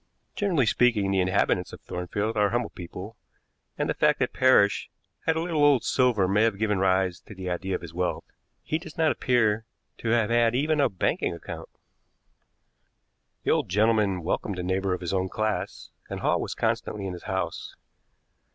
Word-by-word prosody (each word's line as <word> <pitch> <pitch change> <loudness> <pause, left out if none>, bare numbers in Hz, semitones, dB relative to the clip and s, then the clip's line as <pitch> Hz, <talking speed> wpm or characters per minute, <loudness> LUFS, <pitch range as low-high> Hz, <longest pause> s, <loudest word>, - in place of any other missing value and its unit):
Generally 180 - +2
speaking, 110 -3 +2
the 95 -1 +2
inhabitants 90 0 +1
of - - -10
Thornfield 100 +5 -3
are 105 -1 +3
humble 120 0 -1
people, 95 +4 -9 0.6
and - - 0
the - - 0
fact - - +3
that - - -1
Parrish 130 -6 +4 0.4
had 160 - +3
a - - 0
little 165 -3 0
old 145 -4 +5
silver 120 -7 +2
may 100 +3 +2
have 110 -3 +2
given 105 -2 0
rise 95 -1 +2
to 110 - -13
the 95 -1 -4
idea 95 +2 -2
of - - -5
his 85 -1 -9
wealth. 90 -2 -2 0.4
He 155 - -1
does 160 -2 -11
not 160 -1 +3
appear 115 -3 +1 0.3
to 115 - -3
have 115 -1 +2
had 120 0 +3
even 150 +3 +2
a 140 - +3
banking 90 -2 -1
account. - - -8 1.7
"The - - +1
old - - +1
gentleman 105 -2 +2
welcomed 95 +3 -2
a 90 - -3
neighbor 95 +1 0
of - - -9
his 90 +1 -3
own 95 0 0
class, 110 +1 -3 0.2
and - - -5
Hall - - +1
was - - -4
constantly 100 -2 -1
in 95 - -3
his 90 - -10
house. 95 -3 -3
105 Hz, 185 wpm, -26 LUFS, 95-120 Hz, 1.7 s, old